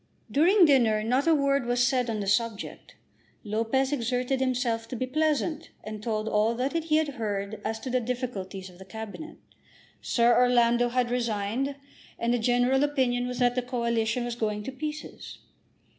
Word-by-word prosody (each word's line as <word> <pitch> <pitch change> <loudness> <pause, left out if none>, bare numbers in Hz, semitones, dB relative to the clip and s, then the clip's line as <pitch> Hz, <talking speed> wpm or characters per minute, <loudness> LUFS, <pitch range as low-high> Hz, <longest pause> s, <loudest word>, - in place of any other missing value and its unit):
During 350 +6 +5
dinner 235 -7 +3
not 255 +7 +1
a 325 - +5
word 280 -3 +1
was 245 0 +2
said 250 -1 +1
on 215 -2 -2
the - - -3
subject. 220 +1 -2 0.5
Lopez 230 +6 0
exerted 250 +1 -1
himself 245 -3 0
to 250 - -6
be 255 - -2
pleasant, 310 +3 -1
and 215 -1 -7
told 215 -1 -2
all 220 +2 +2
that 255 +3 -1
he 325 -2 0
had 310 -1 +2
heard 205 -1 -3
as 220 +1 -3
to 255 - -5
the 255 - +2
difficulties 225 -6 -4
of 180 -1 -15
the 190 - -11
Cabinet. 220 +10 -8 0.6
Sir 235 0 +3
Orlando 240 -1 +4
had 245 0 0
resigned, 235 +3 -1 0.4
and 235 +1 0
the 245 - +1
general 245 +3 +2
opinion 255 -4 +1
was 250 0 -4
that 245 -1 +3
the 250 - 0
Coalition 235 -1 -1
was 240 - -3
going 210 -2 -2
to 265 - -5
pieces. 300 +3 -7
245 Hz, 175 wpm, -27 LUFS, 225-265 Hz, 0.6 s, During